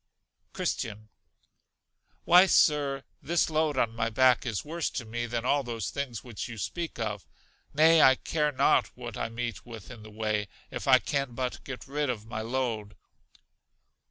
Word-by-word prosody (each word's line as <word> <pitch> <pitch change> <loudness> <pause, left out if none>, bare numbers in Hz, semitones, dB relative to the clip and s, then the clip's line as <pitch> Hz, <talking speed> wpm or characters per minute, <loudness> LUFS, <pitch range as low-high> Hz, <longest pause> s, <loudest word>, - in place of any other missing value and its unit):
Christian. 110 +1 -3 1.1
Why, 180 +2 +7
Sir, 145 -5 +3 0.2
this 165 0 +1
load 155 -2 +1
on 115 -2 +1
my 115 0 0
back 125 +2 +3
is 110 +1 -3
worse 165 +2 -2
to 120 - -5
me 120 +2 -4
than 120 0 -3
all 145 +2 +3
those 115 -5 -4
things 130 -6 -4
which 120 -3 -6
you 115 -2 -8
speak 170 - -4
of; 105 -8 -4 0.4
nay, 160 +2 +6
I 130 - +7
care 150 +2 -1
not 130 - +3
what 120 -3 -7
I - - -3
meet 115 0 -4
with 115 -3 -10
in 115 -3 -10
the 110 - -11
way, 105 -1 -2 0.2
if - - -5
I - - +8
can 140 -4 -2
but 125 0 -3
get 135 -2 -7
rid 145 +1 -2
of 110 -4 -3
my 110 -1 -5
load. 115 -3 -3
120 Hz, 170 wpm, -28 LUFS, 110-140 Hz, 1.1 s, I